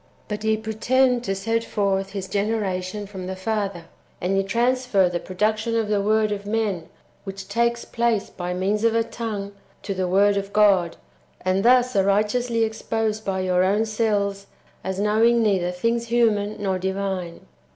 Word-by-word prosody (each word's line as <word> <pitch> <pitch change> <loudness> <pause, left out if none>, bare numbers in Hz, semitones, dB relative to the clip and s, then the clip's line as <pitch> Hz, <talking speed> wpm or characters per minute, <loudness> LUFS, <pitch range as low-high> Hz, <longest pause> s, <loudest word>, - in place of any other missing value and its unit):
"^ - - -34
But 210 0 -4
ye 220 0 +2
pretend 240 +3 +1
to 195 - -1
set 225 +4 -1
forth 195 -3 -1
His 195 -2 -4
generation 200 -1 -2
from 190 -2 -7
the 190 - -4
Father, 195 -3 -3 0.3
and 185 +2 0
ye 195 - +3
transfer 235 -1 +2
the 175 -1 -2
production 215 +5 -1
of 220 -2 0
ih.Q 205 - +2
vrord 215 +1 +2
of 205 0 -4
men 205 -6 -1 0.3
which 195 -1 -7
takes 235 +3 0
place 230 -3 0
by 180 -1 -5
means 195 +4 0
of 230 0 +3
a 230 - +3
tongue 215 -4 -5 0.3
to 200 - -3
the 185 -1 -1
Word 200 +2 +3
of 200 0 -3
God, 195 -5 +3 0.4
and 185 +2 +1
thus 250 +1 +4
are 195 - +4
righteously 225 +4 +1
exposed 220 -1 -2
by 190 -2 -1
your 180 -1 +2
own 205 +4 +2
selves 205 -3 -1 0.4
as 190 0 -3
knowing 225 +3 +3
neither 190 -5 +1
things 230 +6 -1
human 215 -3 +2
nor 190 -2 -1
divine. 190 -2 -3
205 Hz, 170 wpm, -23 LUFS, 190-225 Hz, 0.4 s, thus